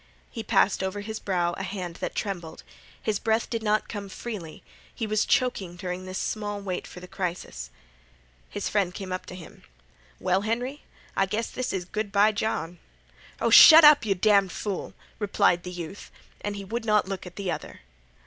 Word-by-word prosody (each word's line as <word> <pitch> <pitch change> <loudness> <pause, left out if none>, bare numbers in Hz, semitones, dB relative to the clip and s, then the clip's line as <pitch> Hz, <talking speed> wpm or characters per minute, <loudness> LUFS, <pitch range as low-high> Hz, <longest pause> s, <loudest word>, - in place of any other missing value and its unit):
He 225 - -5
passed 200 -3 +2
over 190 +2 -3
his 220 +1 -5
brow 175 -3 0
a - - -3
hand 185 -3 -5
that - - -4
trembled. 175 -6 -4 0.4
His 210 -2 -1
breath 225 0 +1
did 230 -1 -1
not 215 0 +1
come 200 -2 -6
freely. 190 -7 -7 0.3
He 225 - -4
was 215 0 0
choking 195 -9 +1
during 180 +1 -5
this 185 0 -5
small 205 -1 -3
wait 185 -3 -4
for - - -10
the 180 - -11
crisis. 175 - -5 0.8
His - - -4
friend 195 -4 0
came 185 -2 -4
to 185 - -8
him. 175 -3 -12 0.6
"Well, 185 +1 +1
Henry, 245 +7 -2 0.3
I 195 - +2
guess 215 +4 -2
this 255 -1 -3
is 185 -2 -3
good 210 +2 -4
by 205 +2 +5
John." 180 -5 -3 0.6
"Oh, 230 - +1
shut 315 +7 +11
up, 300 -3 +8
you 200 -3 +1
damned 200 -1 +3
fool!" 200 0 -4 0.2
replied 200 -4 +2
the 180 - -7
youth, 175 +2 -8 0.3
and 205 0 -2
he 200 -1 -6
would 230 +4 -3
not 210 -3 +2
look 190 -2 -5
at 180 - -11
the 195 -3 -3
other. - - -7
200 Hz, 185 wpm, -26 LUFS, 180-215 Hz, 0.8 s, shut